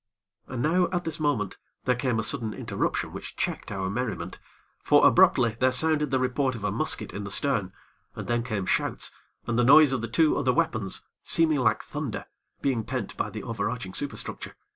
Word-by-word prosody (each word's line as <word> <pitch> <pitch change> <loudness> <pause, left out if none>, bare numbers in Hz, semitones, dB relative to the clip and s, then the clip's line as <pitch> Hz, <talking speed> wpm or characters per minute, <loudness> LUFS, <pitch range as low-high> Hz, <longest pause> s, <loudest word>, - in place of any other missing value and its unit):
And 125 -2 -4
now, 175 +3 +3
at 175 -1 -1
this 160 -2 -3
moment, 140 -11 -1 0.3
there 125 - +3
came 125 -1 -1
a 110 - 0
sudden 115 -4 0
interruption - - -2
which - - -7
checked - - -3
our 95 -2 -2
merriment; 95 -5 -4 0.4
for, - - +4
abruptly, 115 -3 +4
there 130 0 +3
sounded 150 +2 +3
the 135 - +1
report 130 +1 0
of 110 - -8
a 105 - 0
musket - - -1
in 105 - -5
the 100 - -6
stern, 105 -4 +2 0.4
and - - -6
then 120 0 +1
came 110 -6 -3
shouts, - - -1 0.3
and 120 0 0
the - - +4
noise 145 +2 +7
of 130 - -1
the 115 - -3
two 150 +7 +2
other 130 -2 +2
weapons, 110 - -1 0.2
seeming 160 -3 +2
like 125 - +2
thunder, - - -5 0.4
being 125 -5 +1
pent - - -4
by - - -2
the - - -7
over 110 -2 -2
arching 115 -6 -5
superstructure. 145 +6 -4
125 Hz, 195 wpm, -26 LUFS, 110-145 Hz, 0.4 s, noise